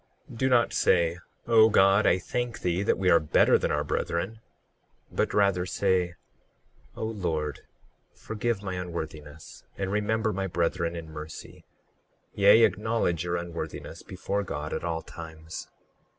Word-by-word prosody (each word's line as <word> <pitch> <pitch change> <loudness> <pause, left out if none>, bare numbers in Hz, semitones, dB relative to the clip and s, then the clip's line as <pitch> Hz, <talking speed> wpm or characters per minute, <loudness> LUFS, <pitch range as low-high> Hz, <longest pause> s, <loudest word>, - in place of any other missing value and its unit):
38:14 - - -10
Do 130 - +2
not 120 -2 +3
say: 85 -1 +2 0.3
O 115 -1 +6
God, 100 0 +5
I - - +4
thank 120 +6 -3
thee 90 +1 0
that 100 - +1
we 95 -1 +2
are 85 - +7
better 75 - +4
than - - -1
our - - 0
brethren; 110 +7 -2 0.7
but - - 0
rather 100 -3 +2
say: 90 -2 +1 0.8
O - - -5
Lord, 80 -9 -2 0.5
forgive 110 -1 -3
my 95 -2 -3
unworthiness, 80 -4 -7
and 95 -1 -2
remember 110 +1 0
my 95 +1 -2
brethren 85 -1 -1
in 80 -2 -7
mercy—yea, 100 +6 -1
acknowledge 105 -7 +1
your 85 0 -1
unworthiness 85 -1 -6
before 100 +2 -3
God 75 -5 -5
at - - -3
all 80 -1 -2
times. 80 -1 -9
90 Hz, 140 wpm, -27 LUFS, 85-105 Hz, 0.8 s, are